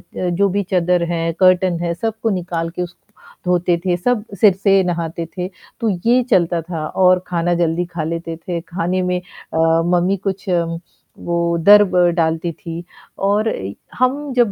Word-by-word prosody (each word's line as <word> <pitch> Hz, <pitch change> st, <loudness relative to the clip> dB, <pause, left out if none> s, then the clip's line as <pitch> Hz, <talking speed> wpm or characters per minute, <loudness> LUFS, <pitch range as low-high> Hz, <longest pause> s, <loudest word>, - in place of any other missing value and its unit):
जो 180 Hz, +2 st, +1 dB
भी 200 Hz, +2 st, 0 dB
चादर 180 Hz, -1 st, +2 dB
है, 165 Hz, -1 st, 0 dB
कर्टेन 185 Hz, -2 st, +4 dB
हैं, 170 Hz, 0 st, 0 dB
सबको 225 Hz, +4 st, -2 dB
निकाल 165 Hz, -1 st, -3 dB
के 180 Hz, +2 st, -5 dB
उसको 175 Hz, 0 st, -8 dB, 0.4 s
धोते 175 Hz, -1 st, +2 dB
थे, 180 Hz, -1 st, +2 dB
सब 215 Hz, +4 st, 0 dB, 0.2 s
सिर 205 Hz, -4 st, +7 dB
से 195 Hz, 0 st, +3 dB
नहाते 170 Hz, -1 st, -3 dB
थे, 180 Hz, +1 st, -2 dB, 0.3 s
तो 225 Hz, -2 st, 0 dB, 0.2 s
ये 245 Hz, +2 st, +4 dB
चलता 170 Hz, -4 st, +2 dB
था। 165 Hz, -2 st, -5 dB
और 185 Hz, -1 st, +3 dB
खाना 175 Hz, 0 st, 0 dB
जल्दी 170 Hz, +2 st, 0 dB
खा 170 Hz, -2 st, -5 dB
लेते 165 Hz, +1 st, -4 dB
थे, 170 Hz, 0 st, -4 dB
खाने 180 Hz, +1 st, -2 dB
में 180 Hz, 0 st, 0 dB, 0.3 s
अ, -, -, -1 dB, 0.4 s
मम्मी 180 Hz, +3 st, +2 dB
कुछ 195 Hz, +1 st, -3 dB, 0.8 s
वो 170 Hz, -, -1 dB, 0.2 s
दर्ब 200 Hz, +1 st, +6 dB, 0.2 s
डालती 165 Hz, 0 st, 0 dB
थी। 165 Hz, +1 st, -8 dB, 0.4 s
और 210 Hz, +2 st, +2 dB, 0.5 s
हम 275 Hz, +3 st, 0 dB
जब 240 Hz, -5 st, +3 dB
180 Hz, 160 wpm, -19 LUFS, 170-195 Hz, 0.8 s, सिर